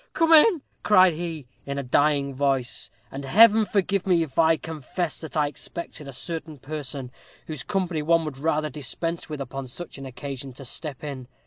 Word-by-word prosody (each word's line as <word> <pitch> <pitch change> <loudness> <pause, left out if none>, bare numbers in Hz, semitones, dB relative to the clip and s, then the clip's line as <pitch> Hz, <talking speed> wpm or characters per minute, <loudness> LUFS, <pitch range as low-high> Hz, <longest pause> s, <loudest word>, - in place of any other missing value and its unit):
'Come 330 -1 +4
in,' 320 0 +7 0.2
cried 185 -4 +6
he, 160 -3 -5 0.2
in 140 0 -4
a 140 - -2
dying 140 +1 +2
voice; 135 -2 0 0.2
and 135 +1 -6
Heaven 215 +9 +6
forgive 200 -1 0
me 175 -3 +4
if 155 -1 -5
I 160 0 +5
confess 160 +2 -4
that 160 -1 -6
I 150 - +4
expected 150 0 -7
a - - -6
certain 155 +2 -3
person, 140 -2 -5 0.3
whose 155 -4 -5
company 185 -2 -1
one 165 +1 +3
would 140 -3 -6
rather 155 0 0
dispense 165 +4 -3
with 150 -2 -5
upon 135 0 -5
such 140 +3 -6
an 135 - -7
occasion, 135 0 -6
to 135 +2 -10
step 145 +2 -4
in. 135 -4 -6
155 Hz, 185 wpm, -25 LUFS, 140-170 Hz, 0.3 s, in